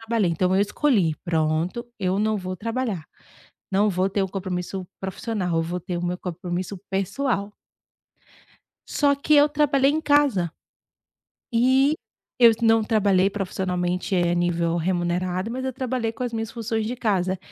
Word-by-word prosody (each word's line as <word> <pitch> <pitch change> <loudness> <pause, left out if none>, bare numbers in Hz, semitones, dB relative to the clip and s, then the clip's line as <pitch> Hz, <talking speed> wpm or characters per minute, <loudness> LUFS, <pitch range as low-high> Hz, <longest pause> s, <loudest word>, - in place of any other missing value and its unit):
não 225 - -13
trabalhei, 220 -7 +2
então 180 +3 +1
eu - - +4
escolhi: 205 - +2
"Pronto, 165 +6 0
eu 185 0 0
não 215 +1 +1
vou 185 -1 -5
trabalhar, 225 -5 -3 0.7
não 205 +2 +3
vou 185 +1 +1
ter 200 0 0
o - - -1
compromisso 185 -1 -4
profissional. 190 -2 -2
Eu 165 - +1
vou 175 +2 -3
ter 175 0 -4
o 175 - -3
meu 180 +1 -2
compromisso 180 +2 -4
pessoal.". 200 +2 -1 1.4
Só 285 -1 +2
que 290 +2 +1
eu 290 0 +6
trabalhei 285 -2 +3
em 310 +2 0
casa. 280 - +3 1.0
E 260 +5 +4 0.4
eu 235 -2 +8
não 225 -1 +4
trabalhei 200 -3 +3
profissionalmente 180 -2 -2
a 175 -1 +2
nível 170 -1 0
remunerado, 180 +3 -1
mas 260 +2 -4
eu 260 - -2
trabalhei 250 -3 -2
com 250 - -7
as 245 - -2
minhas 225 -1 -3
funções 225 -1 -2
de 245 - -2
casa 190 -6 0
195 Hz, 160 wpm, -24 LUFS, 180-235 Hz, 1.4 s, eu